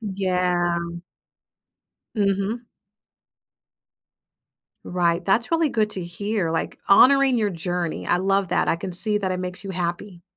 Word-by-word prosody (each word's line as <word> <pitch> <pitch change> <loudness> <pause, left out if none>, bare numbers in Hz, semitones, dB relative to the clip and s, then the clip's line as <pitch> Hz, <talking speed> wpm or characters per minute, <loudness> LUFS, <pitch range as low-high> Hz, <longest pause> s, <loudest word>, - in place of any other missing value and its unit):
Yeah. 180 -4 0 1.4
Mhm. 200 +3 0 2.2
Right, 175 -1 0
that's 225 +5 +2
really 330 -2 +2
good 215 -5 0
to 185 -4 -4
hear, 190 +1 -2
like, 165 - -3
honoring 265 +5 +6
your 215 -3 +1
journey, 175 -1 -3
I 175 - +2
love 195 0 +1
that, - - +1
I - - +2
can 180 +2 -6
see 210 +4 0
that 190 -2 -2
it 185 - -3
makes 180 +1 -6
you 195 - -5
happy. 175 0 -4
190 Hz, 135 wpm, -23 LUFS, 175-210 Hz, 2.2 s, honoring